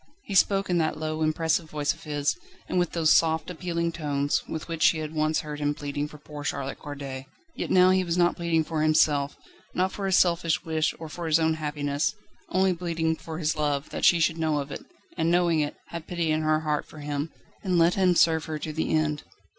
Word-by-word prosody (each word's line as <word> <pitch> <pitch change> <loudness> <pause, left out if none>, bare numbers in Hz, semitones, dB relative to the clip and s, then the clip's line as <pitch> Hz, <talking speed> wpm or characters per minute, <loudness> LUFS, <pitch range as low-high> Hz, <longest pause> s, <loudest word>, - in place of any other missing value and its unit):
He 200 - -6
spoke 195 +1 +3
in 175 -1 +1
that 155 -1 0
low, 155 0 -3
impressive 160 +1 +1
voice 150 -1 0
of - - -16
his, 145 -1 0 0.3
and 180 - 0
with 175 - 0
those 160 -2 +3
soft, 160 +1 +2
appealing 170 -1 -2
tones 145 -3 -1
with 160 - -5
which 165 -1 -5
she 160 - +5
had 155 0 -5
once 155 0 +1
heard 150 -1 -6
him 145 0 0
pleading 145 0 -3
for 150 - -12
poor 150 0 -9
Charlotte 140 -2 -3
Corday. 135 -2 -7 0.3
Yet - - -4
now 185 0 +6
he 185 0 +3
was 170 -1 -1
not 175 -1 +3
pleading 170 -2 +1
for 155 0 -2
himself, 150 -2 +3 0.4
not 185 +1 +1
for 200 -1 -3
his 190 - +4
selfish 170 -1 +2
wish 160 -1 0
or 160 - -7
for 165 +2 -6
his 160 +1 +4
own 160 0 +2
happiness, 150 -1 -1 0.3
only 190 0 +2
pleading 165 -2 -1
for 160 0 -8
his 160 -2 0
love, 145 -2 -1
that - - -5
she 175 - +6
should 165 0 +1
know 155 -2 +1
of 140 0 -4
it, - - -6 0.3
and, 165 0 +1
knowing 175 -2 +3
it, 145 -1 -1
have 170 -2 -7
pity 170 -3 -1
in 155 0 +1
her 155 0 +2
heart 150 -2 -1
for - - -14
him, 145 +1 -3 0.3
and 185 -3 +1
let 170 +1 +5
him 185 -2 +3
serve 160 -2 +4
her 155 -1 -4
to 155 +1 -5
the 160 - -2
end. 150 -2 +1
160 Hz, 225 wpm, -26 LUFS, 150-170 Hz, 0.4 s, now